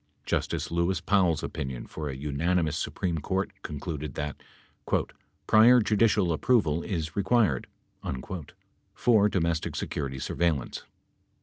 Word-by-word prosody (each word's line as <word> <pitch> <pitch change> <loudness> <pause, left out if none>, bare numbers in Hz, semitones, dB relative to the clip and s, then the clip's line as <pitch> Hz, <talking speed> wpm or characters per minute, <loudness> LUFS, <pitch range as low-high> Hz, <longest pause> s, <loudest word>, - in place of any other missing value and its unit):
Justice - - -1
Lewis 85 +2 +1
Powell's 90 -6 +2
opinion 65 -3 -4
for 75 -2 -5
a 65 - -4
unanimous 75 +3 0
Su - - -2
preme 85 -4 -2
Court 95 +5 -1
concluded 75 -2 -5
that 75 0 -4 1.0
"prior 115 +3 +7
judicial 105 -5 +3
approval 85 -4 +2
is 80 -6 -3
required" 100 - +2 1.3
for 110 -4 +4
domestic 85 -4 -1
security 70 -2 -3
surveillance. 75 -1 -1
85 Hz, 110 wpm, -28 LUFS, 75-100 Hz, 1.3 s, prior